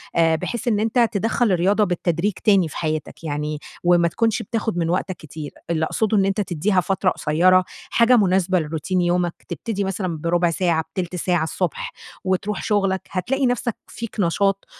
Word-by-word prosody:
آآ 165 Hz, -1 st, +4 dB
بحيث 240 Hz, +8 st, -4 dB
إن 210 Hz, -3 st, +2 dB
أنتَ 225 Hz, +1 st, +2 dB
تدخَّل 225 Hz, +2 st, +1 dB
الرياضة 190 Hz, +4 st, +3 dB
بالتدريج 180 Hz, +1 st, 0 dB
تاني 195 Hz, -6 st, +4 dB
في -, -, -8 dB
حياتَك 155 Hz, 0 st, -3 dB
يعني، 150 Hz, 0 st, -3 dB, 0.2 s
وما 175 Hz, -1 st, +4 dB
تكونش 225 Hz, +6 st, 0 dB
بتاخد 220 Hz, -2 st, -2 dB
من 165 Hz, -1 st, 0 dB
وقتَك 185 Hz, +2 st, -1 dB
كتير. 155 Hz, -1 st, -8 dB, 0.2 s
اللي 160 Hz, -1 st, +1 dB
أقصده 215 Hz, +3 st, 0 dB
إن 195 Hz, -, +4 dB
أنتَ 195 Hz, +2 st, 0 dB
تدِّيها 185 Hz, +1 st, +1 dB
فترة 190 Hz, +1 st, +1 dB
قصيرة، 180 Hz, +5 st, +3 dB, 0.3 s
حاجة 235 Hz, +1 st, +5 dB
مناسبة 185 Hz, -2 st, +3 dB
لروتين 160 Hz, +4 st, -1 dB
يومَك، 175 Hz, 0 st, +1 dB, 0.2 s
تبتدي 215 Hz, -4 st, -3 dB
مثلًا 185 Hz, -4 st, -2 dB
برُبع 170 Hz, +2 st, +1 dB
ساعة، 165 Hz, -1 st, +1 dB
بتلت 180 Hz, -1 st, -3 dB
ساعة 175 Hz, -2 st, +1 dB
الصبح 170 Hz, +1 st, -2 dB, 0.3 s
وتروح 190 Hz, +2 st, -1 dB
شُغلَك. 195 Hz, -3 st, +1 dB
هتلاقي 255 Hz, +9 st, 0 dB
نفسك 245 Hz, -2 st, 0 dB
فيك 230 Hz, -2 st, -7 dB
نشاط 195 Hz, +2 st, +1 dB
185 Hz, 165 wpm, -22 LUFS, 170-205 Hz, 0.3 s, حاجة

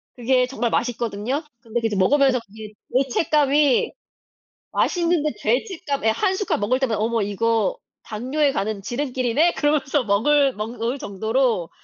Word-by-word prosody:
그게 250 Hz, +1 st, +2 dB
정말 240 Hz, -2 st, -2 dB
맛있거든요. 240 Hz, +4 st, -2 dB, 0.2 s
근데 230 Hz, +1 st, -3 dB
그 225 Hz, -, +1 dB
이제 210 Hz, -, -3 dB
먹으면서 265 Hz, +6 st, +3 dB
그게 215 Hz, +1 st, -11 dB, 0.3 s
죄책감이 290 Hz, 0 st, +2 dB, 0.8 s
맛있는데 335 Hz, -5 st, +1 dB
죄책감 280 Hz, -, -1 dB
예 -, -, +5 dB
1 380 Hz, -, +1 dB
숟갈 405 Hz, -, -1 dB
먹을 245 Hz, +6 st, +1 dB
때마다 230 Hz, -6 st, 0 dB
'어머 225 Hz, 0 st, 0 dB
이거 210 Hz, +1 st, 0 dB, 0.3 s
당뇨에 265 Hz, +7 st, 0 dB
가는 210 Hz, -5 st, -2 dB
지름길이네?' 255 Hz, -, 0 dB
그러면서 290 Hz, -2 st, +1 dB
먹을 270 Hz, +7 st, +3 dB
먹을 230 Hz, +4 st, -3 dB
정도로 220 Hz, -1 st, -1 dB
245 Hz, 325 characters per minute, -22 LUFS, 220-285 Hz, 0.8 s, 예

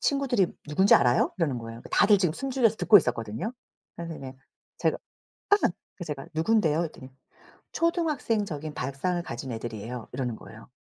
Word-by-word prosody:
친구들이 270 Hz, -9 st, +2 dB, 0.2 s
"누군지 190 Hz, +7 st, +5 dB
알아요?" 125 Hz, -3 st, +4 dB
이러는 145 Hz, -8 st, 0 dB
거예요. 115 Hz, 0 st, -8 dB
다들 205 Hz, 0 st, +5 dB
지금 180 Hz, -5 st, +1 dB
숨죽여서 250 Hz, 0 st, +1 dB
듣고 215 Hz, -, +7 dB
있었거든요. 115 Hz, -, -3 dB, 0.4 s
그래서 170 Hz, -1 st, -6 dB
이제 130 Hz, -1 st, -8 dB, 0.5 s
제가 -, -, +1 dB, 0.5 s
아 410 Hz, -, +8 dB
그래서 -, -, +1 dB, 0.3 s
제가 145 Hz, -3 st, -5 dB
"누군데요?" 160 Hz, -1 st, +2 dB
이랬더니 145 Hz, -5 st, -7 dB, 0.6 s
"초등학생적인 225 Hz, -, -1 dB
발상을 140 Hz, +8 st, -2 dB
가진 125 Hz, -2 st, -6 dB
애들이에요." 115 Hz, 0 st, -6 dB
이러는 125 Hz, -3 st, -2 dB
거예요. 110 Hz, +1 st, -13 dB
155 Hz, 410 characters per minute, -27 LUFS, 125-210 Hz, 0.6 s, 아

